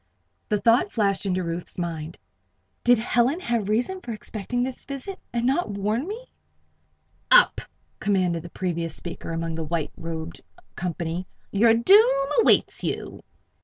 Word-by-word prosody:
The 210 Hz, -, +2 dB
thought 230 Hz, -1 st, +4 dB
flashed 200 Hz, -3 st, +1 dB
into 185 Hz, -1 st, 0 dB
Ruth's 170 Hz, +1 st, -5 dB
mind: 165 Hz, -2 st, -4 dB, 0.7 s
"Did 245 Hz, 0 st, +6 dB
Helen 245 Hz, +7 st, +1 dB
have 235 Hz, -, -1 dB
reason 250 Hz, -, 0 dB
for 235 Hz, -, -5 dB
expecting 220 Hz, +3 st, -3 dB
this 255 Hz, 0 st, -4 dB
visit, 280 Hz, +8 st, -6 dB
and 235 Hz, 0 st, -1 dB
not 270 Hz, +2 st, +1 dB
warn 210 Hz, -, -1 dB
me?" 470 Hz, +5 st, -7 dB, 1.0 s
"Up!" -, -, +6 dB, 0.4 s
commanded 185 Hz, -5 st, +1 dB
the 175 Hz, -, -10 dB
previous 170 Hz, -2 st, -3 dB
speaker 170 Hz, -1 st, -7 dB
among 165 Hz, 0 st, -2 dB
the 160 Hz, 0 st, -3 dB
white 160 Hz, 0 st, -2 dB
robed 160 Hz, -1 st, -6 dB, 0.3 s
company. 175 Hz, 0 st, -3 dB, 0.2 s
"Your 225 Hz, +3 st, +5 dB
doom 370 Hz, -, +5 dB
awaits -, -, +3 dB
you." -, -, -4 dB
210 Hz, 140 wpm, -25 LUFS, 170-245 Hz, 1.0 s, Did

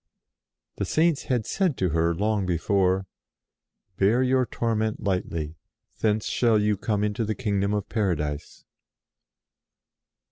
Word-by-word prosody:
The -, -, -1 dB
Saints 160 Hz, -2 st, +1 dB
had 120 Hz, -4 st, 0 dB
said 185 Hz, -8 st, 0 dB
to 90 Hz, -, +1 dB
her, 85 Hz, +1 st, +1 dB
long 105 Hz, 0 st, 0 dB
before: 95 Hz, +2 st, +1 dB, 0.5 s
" 95 Hz, -, -51 dB
Bear 110 Hz, +6 st, +4 dB
your 130 Hz, -1 st, +2 dB
torment 110 Hz, -2 st, -1 dB
lightly: 85 Hz, -5 st, -2 dB, 0.4 s
thence 110 Hz, -1 st, +1 dB
shall 115 Hz, -3 st, +2 dB
you 105 Hz, 0 st, +2 dB
come 105 Hz, +1 st, -1 dB
into 105 Hz, +2 st, -1 dB
the 110 Hz, 0 st, -2 dB
kingdom 100 Hz, -5 st, 0 dB
of 105 Hz, -2 st, -2 dB
Paradise." 75 Hz, -9 st, -2 dB
105 Hz, 130 wpm, -25 LUFS, 95-115 Hz, 0.5 s, Bear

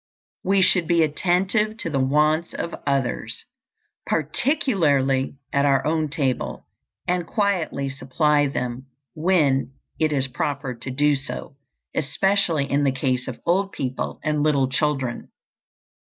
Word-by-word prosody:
We 195 Hz, 0 st, +3 dB
should 175 Hz, -3 st, +3 dB
be 170 Hz, -2 st, +4 dB
attentive 190 Hz, +7 st, +1 dB
to 175 Hz, -, -4 dB
the 135 Hz, -, 0 dB
wants 150 Hz, +5 st, +2 dB
of 170 Hz, -, -4 dB
others, 130 Hz, -5 st, -1 dB, 0.6 s
particularly 150 Hz, -, +1 dB, 0.2 s
at 140 Hz, -, +3 dB
our 135 Hz, -2 st, +3 dB
own 155 Hz, 0 st, +1 dB
table, 135 Hz, -3 st, -2 dB, 0.4 s
and 175 Hz, -1 st, 0 dB
quietly 185 Hz, -10 st, 0 dB
supply 145 Hz, +2 st, +1 dB
them 125 Hz, -1 st, -4 dB, 0.3 s
when 155 Hz, -6 st, +2 dB, 0.3 s
it 155 Hz, -1 st, +2 dB
is 135 Hz, -2 st, +1 dB
proper 140 Hz, 0 st, -3 dB
to 120 Hz, +2 st, -7 dB
do 145 Hz, +3 st, +2 dB
so, 140 Hz, 0 st, -6 dB, 0.4 s
especially 160 Hz, 0 st, +1 dB
in 140 Hz, +1 st, +1 dB
the 140 Hz, -, +3 dB
case 130 Hz, -1 st, -1 dB
of 130 Hz, -, -6 dB
old 195 Hz, +3 st, +1 dB
people 130 Hz, -1 st, -3 dB
and 150 Hz, -1 st, 0 dB
little 145 Hz, -3 st, +3 dB
children. 135 Hz, -3 st, -1 dB
145 Hz, 130 wpm, -23 LUFS, 135-170 Hz, 0.6 s, be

